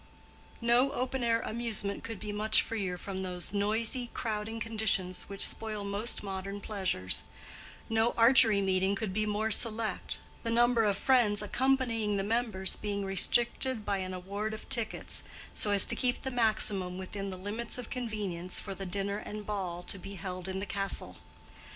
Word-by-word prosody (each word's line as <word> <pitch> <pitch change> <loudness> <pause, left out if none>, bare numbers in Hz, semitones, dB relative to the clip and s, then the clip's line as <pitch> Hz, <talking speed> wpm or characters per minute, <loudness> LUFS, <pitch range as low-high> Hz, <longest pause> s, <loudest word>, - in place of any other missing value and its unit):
No 240 +3 +3
open 260 -1 -2
air 230 -1 +2
amusement 220 -3 -3
could 225 -4 -6
be 210 - -6
much 215 +1 +3
freer 195 -5 -3
from 190 +1 -6
those 180 0 -1
noisy, 220 +4 0
crowding 220 0 -3
conditions 215 -5 -1
which 200 -1 +6
spoil 215 -2 -1
most 200 +4 -1
modern 195 0 -5
pleasures; 190 - 0 0.6
no 225 +1 +2
Archery 230 -3 +7
Meeting 190 0 +1
could 200 -2 -3
be 215 +1 0
more 215 +1 -1
select, 220 -3 +3 0.2
the 230 - -3
number 235 0 +3
of 200 -2 +1
friends 215 -5 +3
accompanying 230 -3 0
the 195 - -1
members 215 -3 +1
being 200 -1 -3
restricted 235 +4 +2
by 200 -1 -1
an 185 0 -4
award 200 +4 -4
of 215 - -11
tickets, 235 -5 -1 0.3
so 210 - +2
as 200 -1 +5
to - - +4
keep 250 -1 -1
the 265 - -3
maximum 210 -6 +1
within 195 +1 -6
the 185 - -6
limits 215 +6 -3
of 250 -2 -8
convenience 205 -8 -2
for 195 - -6
the 195 0 -7
dinner 200 +2 -2
and 210 0 -7
ball 185 -4 -4
to 195 - +1
be 200 +2 -9
held 185 0 -6
in 190 0 -4
the 195 - -3
castle. 195 -1 0
210 Hz, 170 wpm, -30 LUFS, 195-230 Hz, 0.6 s, Archery